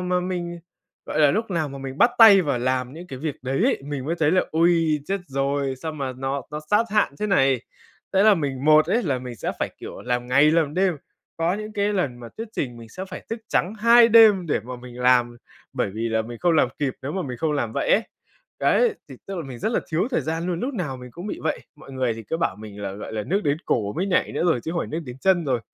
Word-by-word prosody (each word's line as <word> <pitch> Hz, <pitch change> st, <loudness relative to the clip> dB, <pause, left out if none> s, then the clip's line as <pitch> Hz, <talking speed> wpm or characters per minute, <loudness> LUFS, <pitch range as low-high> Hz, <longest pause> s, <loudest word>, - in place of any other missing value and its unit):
mà 180 Hz, 0 st, 0 dB
mình 175 Hz, -1 st, -4 dB, 0.5 s
gọi -, -, -1 dB
là, 145 Hz, -2 st, +6 dB
lúc 220 Hz, +4 st, -1 dB
nào 165 Hz, -4 st, -1 dB
mà 140 Hz, 0 st, -8 dB
mình 135 Hz, +1 st, -7 dB
bắt 240 Hz, -, +6 dB
tay 205 Hz, -5 st, +9 dB
vào 140 Hz, -5 st, -1 dB
làm 125 Hz, +1 st, -1 dB
những 170 Hz, +3 st, -10 dB
cái 135 Hz, -7 st, -8 dB
việc 150 Hz, 0 st, -3 dB
đấy 135 Hz, +1 st, -1 dB
ấy, -, -, +1 dB
mình 140 Hz, -2 st, -4 dB
mới 165 Hz, +4 st, -1 dB
thấy 150 Hz, -2 st, +3 dB
là: 185 Hz, +1 st, +3 dB
ôi, 165 Hz, -1 st, +3 dB
chết 195 Hz, 0 st, -1 dB
rồi, 140 Hz, 0 st, -1 dB
sao 160 Hz, +4 st, -5 dB
mà 135 Hz, -3 st, -4 dB
nó 135 Hz, +1 st, -3 dB
nó 150 Hz, 0 st, -5 dB
sát 210 Hz, +2 st, +4 dB
hạn 210 Hz, -7 st, +2 dB
thế 210 Hz, -, 0 dB
này. 135 Hz, -, +3 dB, 0.5 s
Thế 195 Hz, 0 st, +4 dB
là 215 Hz, 0 st, +7 dB
mình 140 Hz, -6 st, -3 dB
một 155 Hz, 0 st, +6 dB
ấy, 225 Hz, +8 st, +1 dB
là 140 Hz, -, 0 dB
mình 125 Hz, -1 st, -8 dB
sẽ -, -, -3 dB
phải -, -, -1 dB
kiểu -, -, -8 dB
làm 125 Hz, 0 st, -2 dB
ngày 140 Hz, +5 st, +5 dB
làm 155 Hz, -2 st, +1 dB
đêm, 185 Hz, -2 st, +2 dB, 0.4 s
có 165 Hz, +2 st, +1 dB
những 215 Hz, +1 st, -6 dB
cái 205 Hz, 0 st, 0 dB
lần 140 Hz, -11 st, -2 dB
mà 120 Hz, -, -8 dB
thuyết 225 Hz, +1 st, -6 dB
trình 125 Hz, -, -3 dB
mình 115 Hz, -1 st, -11 dB
sẽ 185 Hz, +10 st, -7 dB
phải 185 Hz, -1 st, -9 dB
thức 225 Hz, -, -2 dB
trắng 190 Hz, +5 st, 0 dB
2 235 Hz, +2 st, +6 dB
đêm 215 Hz, -5 st, +6 dB
để 155 Hz, -, 0 dB
mà 125 Hz, +2 st, -8 dB
mình 125 Hz, 0 st, -11 dB
làm, 125 Hz, -1 st, +3 dB, 0.4 s
bởi -, -, -1 dB
vì 115 Hz, +1 st, -2 dB
là 110 Hz, 0 st, 0 dB
mình 120 Hz, +1 st, -8 dB
không 175 Hz, -1 st, +2 dB
làm 155 Hz, -5 st, +3 dB
kịp, 140 Hz, -3 st, -1 dB
nếu 140 Hz, -, -4 dB
mà 190 Hz, -, -2 dB
mình 125 Hz, -5 st, -5 dB
không 155 Hz, +4 st, -1 dB
làm 120 Hz, -6 st, -1 dB
vậy -, -, -1 dB
ấy, 220 Hz, -, +4 dB, 0.6 s
đấy, 470 Hz, -3 st, +3 dB
thì 135 Hz, -, -9 dB
tức 195 Hz, -, -5 dB
là 170 Hz, -, -3 dB
mình 130 Hz, -3 st, -8 dB
rất 220 Hz, -, -1 dB
là -, -, +1 dB
thiếu 175 Hz, +9 st, 0 dB
thời -, -, +1 dB
gian 165 Hz, +2 st, -3 dB
luôn, 175 Hz, -2 st, -2 dB
lúc 265 Hz, +2 st, -3 dB
nào 155 Hz, -, -3 dB
mình 125 Hz, 0 st, -11 dB
cũng 175 Hz, -, -8 dB
bị -, -, -4 dB
vậy. 155 Hz, -, -1 dB, 0.2 s
Mọi 145 Hz, -2 st, -13 dB
người 130 Hz, -3 st, 0 dB
thì 115 Hz, -, -8 dB
cứ 135 Hz, -, -3 dB
bảo 165 Hz, -, -1 dB
mình 105 Hz, -1 st, -10 dB
là, 100 Hz, -1 st, -3 dB
gọi 100 Hz, +3 st, -8 dB
là 110 Hz, -1 st, -2 dB
nước 190 Hz, -, 0 dB
đến 145 Hz, 0 st, +2 dB
cổ 105 Hz, -3 st, 0 dB
mới 180 Hz, -, -2 dB
nhảy 185 Hz, -, +1 dB
nữa -, -, -1 dB
rồi, 160 Hz, -8 st, +2 dB
chứ 160 Hz, -, -5 dB
không 170 Hz, 0 st, -1 dB
phải -, -, -4 dB
nước 160 Hz, -, -3 dB
đến 125 Hz, +1 st, -8 dB
chân 180 Hz, -2 st, +3 dB
rồi. 125 Hz, -4 st, 0 dB
155 Hz, 275 wpm, -23 LUFS, 130-185 Hz, 0.6 s, tay